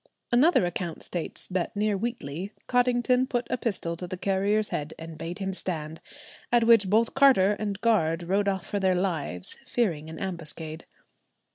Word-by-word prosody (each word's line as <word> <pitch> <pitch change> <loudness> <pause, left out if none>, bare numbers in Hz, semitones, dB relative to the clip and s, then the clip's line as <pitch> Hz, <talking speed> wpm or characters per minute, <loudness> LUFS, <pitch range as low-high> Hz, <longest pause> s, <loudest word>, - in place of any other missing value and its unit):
Another 250 - +5
account 175 -1 -3
states 175 -2 -5
that 185 0 -2
near 210 0 +1
Wheatley, 195 -5 -4 0.2
Cottington 250 +1 +2
put 245 -2 0
a - - +1
pistol 190 -8 -2
to 180 - -6
the 185 - -5
carrier's 200 +3 +1
head 150 +1 -4
and 165 0 -8
bade 165 +3 -5
him 195 -1 -3
stand, 160 -4 -5 0.5
at 240 -1 +4
which 225 -4 +5
both 225 +3 +3
carter 255 -9 +5
and 205 -2 -3
guard 175 -8 +2
rode 195 +4 +1
off 190 -2 -1
for 205 - -2
their 190 -1 +2
lives, 160 - -2
fearing 170 -12 0
an 160 - -8
ambuscade. 160 -3 -4
190 Hz, 165 wpm, -27 LUFS, 165-225 Hz, 0.5 s, Another